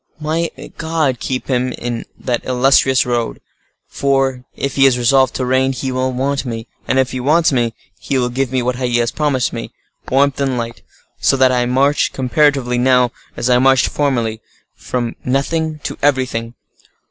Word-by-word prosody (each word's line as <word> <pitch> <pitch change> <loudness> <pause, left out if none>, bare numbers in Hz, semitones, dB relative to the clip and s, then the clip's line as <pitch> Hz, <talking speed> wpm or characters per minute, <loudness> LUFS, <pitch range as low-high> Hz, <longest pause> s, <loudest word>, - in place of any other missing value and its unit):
May 160 +2 -1 0.3
God 160 -6 0
keep 130 -1 -3
him 125 -1 0
in 120 -1 -4
that 120 -2 -2
illustrious 130 +1 +3
road! 120 -2 -2 0.5
For, 135 -2 0
if 140 - -3
he 135 0 +6
is 125 -2 +2
resolved 130 +2 +3
to 130 - -1
reign, 130 +1 +2
he 130 0 -3
will 130 0 -1
want 135 +2 -1
me; 115 -3 -5 0.2
and 130 - +1
if 130 -1 +2
he 130 - -4
wants 155 +6 +3
me, 120 -4 0 0.2
he 135 - -2
will 125 -1 +1
give 130 +1 -2
me 130 -2 0
what 125 0 -1
he 125 -2 0
has 120 0 +1
promised 140 -6 0
me—warmth 140 +1 -2
and 135 -2 0
light; 115 0 -5 0.4
so 135 - +2
that 130 -1 +4
I 125 -1 +1
march, 140 +4 +2
comparatively, 130 -1 +1
now, 125 -1 +3 0.3
as 120 - -1
I 125 -1 +4
marched 135 0 +4
formerly,—from 120 -2 -3
nothing 155 +4 -1
to - - -4
everything. 130 -4 0
130 Hz, 170 wpm, -17 LUFS, 125-135 Hz, 0.5 s, he